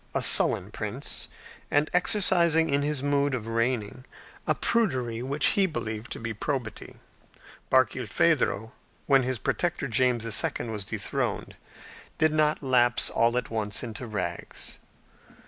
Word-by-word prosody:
a -, -, +2 dB
sullen -, -, +5 dB
prince, -, -, -4 dB, 0.4 s
and 145 Hz, +1 st, +2 dB
exercising 175 Hz, -4 st, +3 dB
in 140 Hz, +1 st, +2 dB
his 145 Hz, -2 st, -1 dB
mode 145 Hz, -1 st, +1 dB
of 115 Hz, -3 st, -5 dB
reigning 115 Hz, 0 st, -1 dB, 0.4 s
a -, -, +2 dB
prudery 130 Hz, -, 0 dB
which 140 Hz, +4 st, +2 dB
he 195 Hz, -1 st, +2 dB
believed 110 Hz, -8 st, -5 dB
to -, -, -4 dB
be 115 Hz, 0 st, -4 dB
probity. 120 Hz, +1 st, -4 dB, 0.7 s
Barkilphedro, 130 Hz, -2 st, +1 dB, 0.3 s
when 135 Hz, -2 st, +4 dB
his 130 Hz, 0 st, -2 dB
protector, 170 Hz, +4 st, -1 dB
James 125 Hz, -1 st, +1 dB
II., 115 Hz, +1 st, 0 dB
was 105 Hz, -3 st, -4 dB
dethroned, -, -, -3 dB, 0.6 s
did 155 Hz, -1 st, +2 dB
not 155 Hz, -1 st, +1 dB
lapse 120 Hz, -2 st, +2 dB
all 120 Hz, +1 st, +2 dB
at 125 Hz, -, -3 dB
once 105 Hz, -1 st, -2 dB
into 120 Hz, +1 st, -6 dB
rags. 90 Hz, -5 st, -5 dB
130 Hz, 130 wpm, -27 LUFS, 115-150 Hz, 0.7 s, sullen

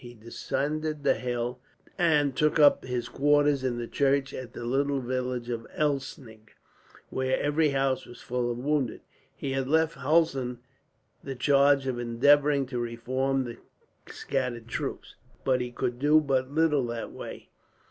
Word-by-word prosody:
He 120 Hz, 0 st, -10 dB
descended 150 Hz, +6 st, -3 dB
the -, -, +4 dB
hill, 120 Hz, +1 st, -3 dB, 0.4 s
and 150 Hz, -6 st, +2 dB
took 150 Hz, +2 st, +2 dB
up 145 Hz, -2 st, +6 dB
his 125 Hz, -2 st, -3 dB
quarters 145 Hz, +1 st, +2 dB
in 125 Hz, -2 st, -1 dB
the 120 Hz, -, -3 dB
church 135 Hz, +2 st, +1 dB
at 125 Hz, -2 st, -7 dB
the 120 Hz, -, -6 dB
little 140 Hz, +3 st, +1 dB
village 125 Hz, -1 st, -3 dB
of 115 Hz, -1 st, -4 dB
Elsnig, 135 Hz, -6 st, -3 dB, 0.6 s
where 130 Hz, 0 st, 0 dB
every 150 Hz, +1 st, +2 dB
house 135 Hz, -1 st, 0 dB
was 120 Hz, -, -12 dB
full 125 Hz, 0 st, -2 dB
of 120 Hz, -, -3 dB
wounded. 140 Hz, -1 st, -1 dB, 0.3 s
He 135 Hz, -, -4 dB
had 135 Hz, -1 st, -1 dB
left 160 Hz, +2 st, +2 dB
Hulsen 135 Hz, -4 st, +1 dB, 0.7 s
the 135 Hz, -1 st, -5 dB
charge 140 Hz, +1 st, +4 dB
of 130 Hz, -2 st, -2 dB
endeavouring 140 Hz, +4 st, +3 dB
to 125 Hz, -1 st, -4 dB
reform 130 Hz, +3 st, -1 dB
the 120 Hz, -2 st, -7 dB, 0.5 s
scattered 125 Hz, -4 st, -3 dB
troops, -, -, -5 dB, 0.3 s
but 130 Hz, -2 st, +2 dB
he 125 Hz, 0 st, -4 dB
could 120 Hz, 0 st, -3 dB
do 150 Hz, +3 st, +5 dB
but 135 Hz, -3 st, 0 dB
little 150 Hz, -3 st, +2 dB
that 115 Hz, -1 st, -5 dB
way. -, -, -9 dB
135 Hz, 155 wpm, -28 LUFS, 120-145 Hz, 0.7 s, up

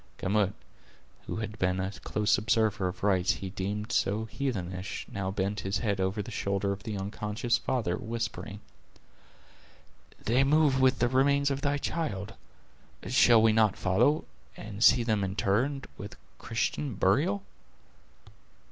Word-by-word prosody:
Gamut, 100 Hz, 0 st, +1 dB, 0.7 s
who -, -, -3 dB
had 110 Hz, -1 st, -5 dB
been 90 Hz, 0 st, +1 dB
a 95 Hz, +1 st, -2 dB
close 105 Hz, +1 st, 0 dB
observer 110 Hz, -3 st, +1 dB
of 90 Hz, +1 st, -7 dB
rites 95 Hz, -3 st, +3 dB
he 95 Hz, -1 st, -6 dB
deemed 105 Hz, +3 st, -4 dB
so 105 Hz, +3 st, +1 dB
heathenish, 95 Hz, -7 st, -4 dB
now 100 Hz, -1 st, -3 dB
bent 100 Hz, +1 st, -2 dB
his 95 Hz, 0 st, -1 dB
head 100 Hz, -4 st, -1 dB
over 95 Hz, +3 st, -1 dB
the 120 Hz, -, -9 dB
shoulder 100 Hz, -1 st, -1 dB
of 100 Hz, 0 st, -4 dB
the 105 Hz, +1 st, -5 dB
unconscious 105 Hz, +4 st, -1 dB
father, 115 Hz, -10 st, -1 dB
whispering: 115 Hz, -3 st, -5 dB, 1.6 s
"They 125 Hz, +4 st, +3 dB
move 140 Hz, -1 st, +3 dB
with 130 Hz, -1 st, +4 dB
the 120 Hz, -, +2 dB
remains 140 Hz, +2 st, +2 dB
of 135 Hz, 0 st, -2 dB
thy 145 Hz, +1 st, +1 dB
child; 115 Hz, -, -3 dB, 0.7 s
shall 120 Hz, -2 st, +5 dB
we 110 Hz, -1 st, +5 dB
not 110 Hz, -2 st, +3 dB
follow, 120 Hz, +12 st, +2 dB, 0.3 s
and 105 Hz, 0 st, -4 dB
see 120 Hz, +1 st, +6 dB
them 110 Hz, -3 st, 0 dB
interred 110 Hz, +8 st, 0 dB
with 105 Hz, -, -8 dB, 0.2 s
Christian 130 Hz, +2 st, -2 dB
burial?" 100 Hz, +1 st, +2 dB
105 Hz, 140 wpm, -29 LUFS, 100-120 Hz, 1.6 s, see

